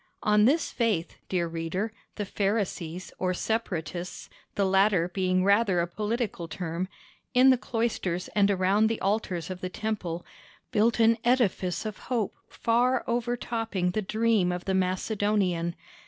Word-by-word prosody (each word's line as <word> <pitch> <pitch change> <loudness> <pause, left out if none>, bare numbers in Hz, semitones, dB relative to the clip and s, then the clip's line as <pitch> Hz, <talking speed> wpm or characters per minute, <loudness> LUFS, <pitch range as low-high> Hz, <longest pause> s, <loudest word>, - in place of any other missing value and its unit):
On 210 0 +4
this 290 +5 +2
faith, 215 -8 -1
dear 180 -2 +1
reader, 165 +6 -3 0.2
the 205 - -3
Pharisees 190 -4 -2
or 185 -1 0
Separatists—the 180 -2 -3
latter 190 -2 +3
being 185 0 +1
rather 200 -2 +3
a 170 - +2
political 210 -1 -3
term—in 185 +9 0
the 255 - +4
cloisters 225 -8 -1
and 205 -1 +3
around 200 +2 +3
the 225 0 -1
altars 190 -4 -1
of 185 0 -6
the 185 - -3
Temple, 185 -5 -3 0.5
built 230 0 +2
an 225 0 +5
edifice 230 -7 +1
of 215 -2 -5
hope 235 -6 0 0.2
far 245 +2 +2
overtopping 230 -5 -1
the 215 - -1
dream 215 -2 +2
of 180 0 -4
the 190 - 0
Macedonian. 185 -2 0
200 Hz, 135 wpm, -28 LUFS, 180-225 Hz, 0.5 s, an